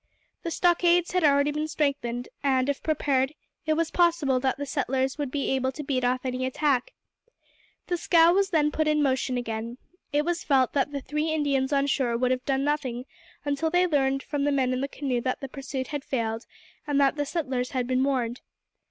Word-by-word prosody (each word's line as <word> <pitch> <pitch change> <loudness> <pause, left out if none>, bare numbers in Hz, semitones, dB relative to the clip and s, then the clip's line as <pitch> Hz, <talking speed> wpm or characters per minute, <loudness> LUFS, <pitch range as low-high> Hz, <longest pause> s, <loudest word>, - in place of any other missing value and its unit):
The 335 - -3
stockades 345 0 +3
had 365 -1 +1
already 285 0 +4
been 300 +1 -2
strengthened, 260 -6 -1
and 260 -2 +2
if 285 - -1
prepared, 275 -3 +1 0.3
it 310 - +3
was 325 0 0
probable 330 -7 +2
that 260 0 0
the 285 - -4
settlers 265 0 -1
would 290 -3 -1
be 280 +1 -2
able 260 0 0
to 300 - -6
beat 265 -2 -1
off 255 +1 0
any 255 0 -2
attack. 260 -1 0 0.9
The 355 - -1
scow 335 0 +5
was 390 +1 +2
then 300 -4 +2
put 310 +1 0
in 300 -1 +3
motion 260 -2 0
again. 230 0 -4 0.3
It 295 +1 +1
was 345 0 -1
felt 265 -3 +2
that 285 0 +1
the 280 -1 -4
three 300 +4 -2
Indians 280 -3 0
on 280 -1 +2
shore 255 -4 0
would 250 +1 +1
have 255 0 -1
done 270 -1 +1
nothing 265 -4 -1 0.4
until 285 +3 0
they 355 +2 +3
learned 275 -4 +1
from 290 -2 -2
the 290 - +2
men 260 -2 +1
in 255 - -1
the 275 - -1
canoe 265 -4 -2
that 255 +1 -2
the 270 - -5
pursuit 265 -1 -5
had 290 -2 -4
failed, 225 -2 -3 0.4
and 285 -1 +1
that 275 0 +3
the 290 - -1
settlers 265 -5 -2
had 255 -2 -1
been 255 +1 +1
warned. 255 -3 -1
275 Hz, 205 wpm, -26 LUFS, 255-300 Hz, 0.9 s, scow